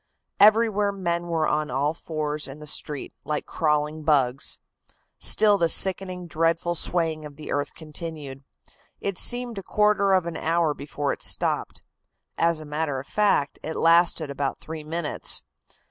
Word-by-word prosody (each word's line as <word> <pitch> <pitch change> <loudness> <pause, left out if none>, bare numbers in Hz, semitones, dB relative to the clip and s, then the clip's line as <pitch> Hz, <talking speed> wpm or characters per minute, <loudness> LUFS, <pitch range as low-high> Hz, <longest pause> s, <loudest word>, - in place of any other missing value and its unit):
"Everywhere 210 -1 +5
men 175 -3 -2
were 165 -2 0
on 150 0 0
all 140 +4 0
fours 155 -2 -4
in 135 +1 -9
the 150 - -10
street, 150 -1 -4
like 150 -1 -3
crawling 150 0 0
bugs. 140 -4 +2 0.6
Still 205 -2 +4
the 170 - +2
sickening, 185 0 +2
dreadful 165 +1 0
swaying 165 -2 -1
of 150 -1 -9
the 150 +1 -8
earth 145 0 -2
continued. 155 -4 -7 0.6
It 200 -2 -3
seemed 240 -3 +1
a - - -6
quarter 205 -1 +2
of 185 -2 +3
an 170 -1 -4
hour 165 -1 +1
before 145 0 -3
it - - -10
stopped. - - -1 0.5
As 165 +3 +2
a 155 - -8
matter 150 -2 -2
of 130 - -8
fact, 200 -8 +1
it 160 - -5
lasted 165 -2 +4
about 140 -1 -2
three 160 -1 -8
minutes. 160 0 +1
160 Hz, 155 wpm, -25 LUFS, 150-175 Hz, 0.6 s, Everywhere